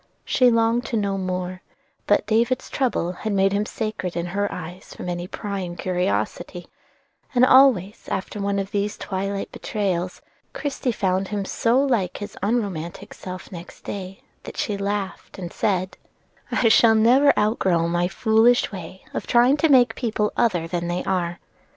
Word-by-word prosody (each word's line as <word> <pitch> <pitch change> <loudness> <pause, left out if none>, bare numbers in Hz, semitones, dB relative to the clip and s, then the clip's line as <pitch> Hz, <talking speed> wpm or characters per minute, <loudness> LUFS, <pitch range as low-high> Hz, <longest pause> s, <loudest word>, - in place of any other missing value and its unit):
She 250 -1 +4
longed 230 +1 +2
to 230 - -1
know 200 -2 0
more; 185 0 -3 0.5
but - - +3
"David's 235 +3 +1
trouble" 210 -10 0
made 195 -2 +2
him 205 +1 0
sacred 215 -5 -4
in 170 - -1
her 205 0 0
eyes 180 +1 -8
from - - -7
any 175 0 -3
prying 190 -3 -5
curiosity, 175 - -2 0.7
and 245 +1 +6
always 255 -7 +4
after 195 +2 -3
one 200 0 0
of 195 0 -3
these 205 0 -1
twilight 195 +1 -3
betrayals 185 -4 -2 0.3
Christie 275 -3 -2
found 190 -3 0
him 205 -1 -3
so 235 +5 +2
like 235 -10 +1
his 205 - -7
unromantic 195 -6 -2
self 185 0 -8
next 175 -1 -10
day, 190 -1 -7 0.2
that - - -10
she 210 - -1
laughed 200 -1 -4
and 175 -3 -6
said: 185 -2 -1 0.5
"I - - -1 0.4
never 240 +6 +5
shall 280 - +7
outgrow 190 -6 +2
my 175 +1 +1
foolish 225 +4 +3
way 185 -1 -9
of - - -4
trying 245 +3 +5
to 320 +2 +2
make 255 -3 +5
people 215 -3 -1
other 180 -9 +1
than 170 0 -2
they 175 +1 -2
are. 175 -2 -1
200 Hz, 155 wpm, -23 LUFS, 180-225 Hz, 0.7 s, shall